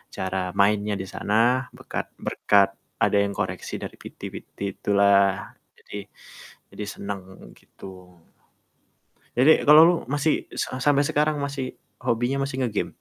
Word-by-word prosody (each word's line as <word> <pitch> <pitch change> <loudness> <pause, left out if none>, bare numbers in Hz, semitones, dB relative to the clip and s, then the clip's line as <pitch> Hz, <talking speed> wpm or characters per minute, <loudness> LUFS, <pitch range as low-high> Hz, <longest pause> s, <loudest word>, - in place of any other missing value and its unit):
cara 95 0 -3 0.2
mainnya 105 +1 +3
di - - -6
sana 105 +2 -3 0.4
bekat - - -5
berkat 100 -1 +2 0.3
ada 100 - +3
yang 100 0 -2
koreksi 95 -3 -3
dari - - -7
PT-PT - - -10 0.2
itulah. 100 -1 +3 0.2
Jadi 105 - -9 0.8
jadi 105 - -5
seneng, 95 -2 -8
gitu. 90 -2 -14 1.2
Jadi 145 +5 +5
kalo 150 +1 +9
lu 170 +2 +7 0.2
masih 145 +2 +1
e - - -9
sa 130 - -3
sampe 145 +2 +3
sekarang 150 0 +1
masih 140 -2 -4 0.3
hobinya 120 +4 +1
masih 135 -1 -5
nge-game? 110 -5 -1
105 Hz, 130 wpm, -24 LUFS, 100-140 Hz, 1.2 s, kalo